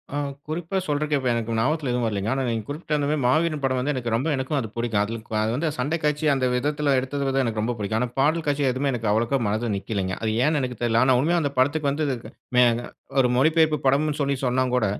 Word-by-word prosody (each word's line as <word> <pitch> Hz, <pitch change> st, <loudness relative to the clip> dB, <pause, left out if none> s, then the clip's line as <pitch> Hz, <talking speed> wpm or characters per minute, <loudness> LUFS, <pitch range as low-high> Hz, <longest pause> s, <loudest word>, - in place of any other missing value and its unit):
ஆ -, -, -1 dB, 0.3 s
குறிப்பா 165 Hz, +4 st, -3 dB
சொல்றதுக்கு, 150 Hz, -1 st, 0 dB
இப்ப 130 Hz, -, -2 dB
எனக்கு 115 Hz, -1 st, -2 dB
ஞாபகத்தில 145 Hz, +4 st, 0 dB
எதுவும் 120 Hz, -1 st, 0 dB
வரலைங்க. 105 Hz, -1 st, -1 dB
ஆனா 135 Hz, 0 st, -1 dB
நீங்க 115 Hz, -2 st, -1 dB
குறிப்பிட்ட 150 Hz, +1 st, -3 dB
அந்த 145 Hz, -1 st, 0 dB
மாரி 150 Hz, 0 st, +1 dB
மாவீரன் 155 Hz, +3 st, +2 dB
படம் 130 Hz, -1 st, +1 dB
வந்து 135 Hz, +4 st, 0 dB
எனக்கு 120 Hz, -4 st, -3 dB
ரொம்ப 120 Hz, +7 st, 0 dB
எனக்கும் 130 Hz, +3 st, -2 dB
அது 115 Hz, -, -3 dB
பிடிக்கும். 115 Hz, -3 st, 0 dB
அதுல 115 Hz, +2 st, -4 dB
கு -, -, -9 dB
அது 110 Hz, +1 st, 0 dB
வந்து 160 Hz, +5 st, -1 dB
சண்டை 145 Hz, +6 st, 0 dB
காட்சி 150 Hz, +1 st, 0 dB
அந்த 135 Hz, -2 st, 0 dB
விதத்தில 145 Hz, +2 st, +1 dB
எடுத்தது 135 Hz, 0 st, -1 dB
எனக்கு 110 Hz, -3 st, -1 dB
ரொம்ப 120 Hz, +3 st, -1 dB
பிடிக்கும். 105 Hz, +2 st, -1 dB
ஆனா 125 Hz, -, 0 dB
பாடல் 155 Hz, +4 st, +2 dB
காட்சி 145 Hz, 0 st, +1 dB
எதுவுமே 135 Hz, +3 st, -1 dB
எனக்கு 115 Hz, -3 st, -2 dB
அவ்ளோகா 115 Hz, +5 st, +1 dB
மனதுல 110 Hz, +2 st, -1 dB
நிக்கலைங்க. 95 Hz, -1 st, -3 dB
அது 110 Hz, -1 st, 0 dB
ஏன்னு 155 Hz, 0 st, +2 dB
எனக்கு 125 Hz, -3 st, -4 dB
தெரியல. 115 Hz, -1 st, +2 dB
ஆனா 130 Hz, 0 st, +4 dB
உண்மையா 170 Hz, +6 st, +2 dB
அந்த 145 Hz, -2 st, -1 dB
படத்துக்கு 145 Hz, +2 st, +2 dB
வந்ததுக்கு 140 Hz, -5 st, -3 dB, 0.3 s
மேனா 120 Hz, -1 st, +4 dB, 0.4 s
ஒரு 125 Hz, -, +2 dB
மொழிபெயர்ப்பு 155 Hz, +1 st, +3 dB
படம்னு 145 Hz, +3 st, +2 dB
சொல்லி 140 Hz, 0 st, +1 dB
சொன்னா 130 Hz, +1 st, +2 dB
கூட, 125 Hz, -4 st, +2 dB
130 Hz, 230 wpm, -24 LUFS, 115-150 Hz, 0.4 s, ஆனா